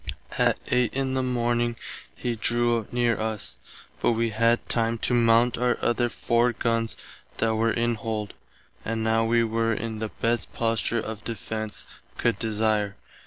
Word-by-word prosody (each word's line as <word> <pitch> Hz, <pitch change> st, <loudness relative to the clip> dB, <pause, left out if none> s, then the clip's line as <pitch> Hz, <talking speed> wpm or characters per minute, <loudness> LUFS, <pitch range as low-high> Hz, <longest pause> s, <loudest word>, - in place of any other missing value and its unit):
At -, -, +3 dB
8 125 Hz, -1 st, +2 dB
in 135 Hz, -1 st, 0 dB
the 130 Hz, -, +1 dB
morning 120 Hz, -1 st, 0 dB, 0.4 s
he 120 Hz, -1 st, -2 dB
drew 120 Hz, 0 st, +1 dB
near 120 Hz, -1 st, +1 dB
us, 110 Hz, -1 st, -3 dB, 0.4 s
but -, -, +3 dB
wee 115 Hz, 0 st, 0 dB
had 115 Hz, +2 st, +2 dB
time 115 Hz, 0 st, +1 dB
to 125 Hz, -, 0 dB
mount 115 Hz, 0 st, +4 dB
our 125 Hz, -1 st, +2 dB
other 120 Hz, 0 st, +1 dB
four 120 Hz, +1 st, +1 dB
guns 115 Hz, 0 st, -1 dB, 0.4 s
that 110 Hz, 0 st, +1 dB
were 115 Hz, +1 st, +2 dB
in 120 Hz, +1 st, +1 dB
hold, 110 Hz, -2 st, -3 dB, 0.5 s
and 110 Hz, 0 st, -2 dB
now 110 Hz, 0 st, +2 dB
wee 115 Hz, +1 st, +3 dB
were 115 Hz, 0 st, +1 dB
in 110 Hz, 0 st, -4 dB
the 110 Hz, 0 st, -3 dB
best 115 Hz, +2 st, -1 dB
posture 115 Hz, 0 st, 0 dB
of 110 Hz, -1 st, -5 dB
defence 110 Hz, -2 st, -4 dB, 0.3 s
could 115 Hz, -4 st, +1 dB
desire. 110 Hz, -2 st, +1 dB
115 Hz, 160 wpm, -26 LUFS, 110-120 Hz, 0.5 s, mount